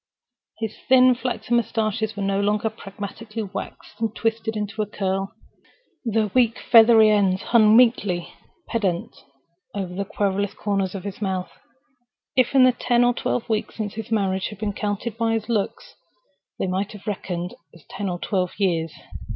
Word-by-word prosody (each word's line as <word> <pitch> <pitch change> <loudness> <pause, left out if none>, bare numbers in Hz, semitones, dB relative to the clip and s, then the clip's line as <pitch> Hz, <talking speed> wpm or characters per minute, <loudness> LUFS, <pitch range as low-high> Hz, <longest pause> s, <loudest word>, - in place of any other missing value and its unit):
His 220 -1 -4
thin 255 -1 +7
flaxen 240 -2 -1
mustaches 220 -2 -1
were 200 - -2
no 195 0 +1
longer 210 +2 +1
pragmatically 215 +2 -7
waxed 205 +3 -8
and 225 0 -1
twisted 225 -1 -1
into 210 +1 -3
a 210 - -1
curl: 195 -1 -2 0.7
their 220 -3 0
weak 240 -2 +3
feathery 225 -2 +6
ends 195 -3 +2
hung 220 -2 +5
meekly 205 -8 +2 0.3
pendent 190 -7 -1 0.6
over 190 -3 -3
the 200 +2 -2
querulous 200 0 -1
corners 195 -2 -1
of 190 - -5
his 200 +1 -7
mouth. 190 -2 -2 0.8
If 255 -2 +3
the 255 -2 +6
ten 240 0 +3
or 245 0 +4
twelve 240 0 -2
weeks 220 -2 -2
since 210 -3 -4
his 225 0 -6
marriage 190 -4 0
had 210 - -9
been 210 0 -2
counted 210 +2 -3
by 225 -1 +2
his 225 0 -2
locks, 215 -4 -2 0.6
they - - -1
might 190 +3 -2
have 205 - -12
reckoned 180 -4 -4 0.2
as 165 -4 -18
ten 200 0 -4
or 175 - -2
twelve 185 -1 -1
years. 170 -5 0
210 Hz, 160 wpm, -23 LUFS, 195-225 Hz, 0.8 s, thin